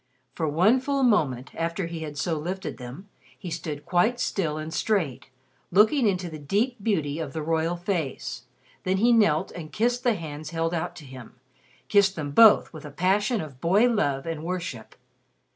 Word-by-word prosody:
For 160 - -2
one 185 - +4
full 275 +1 -1
moment, 145 - +1
after 165 +3 -2
he 170 0 -6
had 150 -2 -6
so 160 +2 -1
lifted 180 +5 -4
them, 125 +11 -9 0.3
he 180 -4 -7
stood 155 -3 -5
quite 180 +8 +2
still 160 -10 -1
and 155 +1 -6
straight, 155 - -1 0.4
looking 215 - +4
into 185 -2 0
the 155 -2 -8
deep 210 - 0
beauty 160 -9 0
of 150 -4 -5
the 160 - -3
royal 165 +2 0
face. 175 -6 -3 0.4
Then 185 +1 0
he 235 +5 +4
knelt 205 -10 +3
and 160 -3 -8
kissed 240 +3 0
the 240 -4 +3
hands 155 -3 -7
held 165 0 -1
out 170 +1 -3
to 155 - -11
him 130 -3 -11 0.5
kissed 200 -1 +4
them 145 -3 -4
both 220 +3 +6
with 155 - -9
a 150 - -7
passion 200 - +1
of 140 -5 -10
boy 200 +8 +4
love 145 - 0
and 165 -2 -4
worship. 170 -10 -5
170 Hz, 180 wpm, -26 LUFS, 155-205 Hz, 0.5 s, both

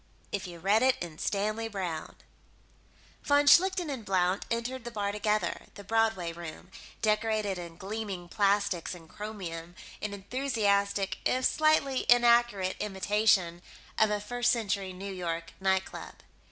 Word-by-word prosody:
If 200 -2 -3
You 175 -1 -9
Read 200 +6 +3
It 260 0 +4
in 165 -3 -7
Stanley 215 +3 -1
Browne 185 -7 -4 1.1
Von 285 0 +3
Schlichten 365 +3 +5
and 260 -5 -5
Blount 185 -1 +1
entered 235 +2 -2
the 240 - -5
bar 205 -3 -2
together 210 +1 -1
the 200 - -9
Broadway 220 -5 +1
Room, 170 +2 -9 0.3
decorated 215 -3 +1
in 170 -1 -8
gleaming 195 -2 -5
plastics 200 -3 +1
and 165 -2 -13
chromium 175 -5 -7 0.3
in 210 - -3
enthusiastic 200 -3 0
if 255 0 +1
slightly 310 -4 +2
inaccurate 235 -5 +4
imitation 195 -3 +1 0.4
of 220 - +5
a 210 0 0
First 245 +4 +1
Century 200 -5 -1
New 195 +2 -6
York 170 -2 -4
nightclub. 190 0 -1
205 Hz, 135 wpm, -29 LUFS, 185-225 Hz, 1.1 s, Schlichten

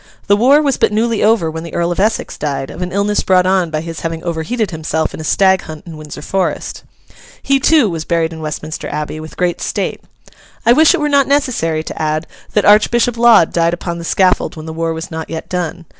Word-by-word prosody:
The 200 - +4
war 270 +8 +4
was 275 -3 +1
but - - +2
newly 225 +1 0
over 210 -7 +2
when 160 +1 -6
the 170 - -8
Earl 170 0 0
of 175 - -3
Essex 215 +3 0
died, 140 -2 -3
of 180 - -9
an 180 0 -3
illness 200 +2 0
brought 185 -1 +3
on 185 -2 +2
by 155 -1 -2
his 165 0 -7
having 165 -1 -4
overheated 175 +7 -2
himself 160 0 -2
in - - -8
a - - -5
stag 190 +3 +3
hunt 155 -1 -10
in 165 -2 -9
Windsor 150 -1 -9
Forest. 190 +2 -2 0.6
He, 275 0 +2
too, 295 -3 +4
was 165 -4 -3
buried 165 0 0
in 160 - -8
Westminster 155 0 -5
Abbey, 150 +1 -4
with 155 0 -10
great 180 -1 -1
state. - - -3 0.6
I 235 - +6
wish 310 +4 +5
it - - -3
were 295 - 0
not 280 -2 +3
necessary 240 - 0
to - - -7
add 155 +1 -1 0.3
that 210 - +2
Archbishop 230 +3 +4
Laud 235 -7 +5
died 170 0 +2
upon 170 -1 -5
the - - -7
scaffold 185 +2 +1
when 155 -1 -9
the 160 - -6
war 165 0 -2
was 160 +1 -6
not 160 0 -5
yet 160 - -5
done. 180 -1 -4
170 Hz, 230 wpm, -16 LUFS, 160-215 Hz, 0.6 s, I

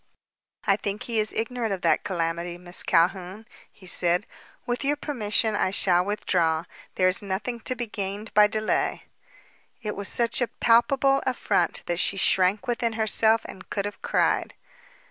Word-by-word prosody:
"I 195 - +3
think 205 0 -4
he 230 -2 -2
is 215 0 +2
ignorant 230 0 -3
of 190 -2 -3
that - - +2
calamity, 170 -1 -3
Miss 175 0 -2
Calhoun," 185 +4 0 0.3
he 190 - -18
said. 180 +1 +3 0.4
"With 245 +2 -3
your 285 +2 +1
permission, 220 -7 0
I 195 - +1
shall 180 -2 +2
withdraw. 175 -5 0 0.3
There 185 - +3
is 185 - +3
nothing 205 +5 -4
to 255 +3 -3
be 245 - -4
gained 205 0 -6
by 210 0 +6
delay." 215 0 -1 0.8
It 210 -1 -3
was 200 0 -3
such 235 +1 +2
a 245 - +2
palpable 270 +5 +2
affront 240 -8 0
that 175 0 -1
she 195 - +1
shrank 190 +3 +2
within 235 -2 -1
herself 220 0 +4
and 185 - -11
could 200 -1 -2
have 205 - -7
cried. - - 0
210 Hz, 165 wpm, -25 LUFS, 185-230 Hz, 0.8 s, by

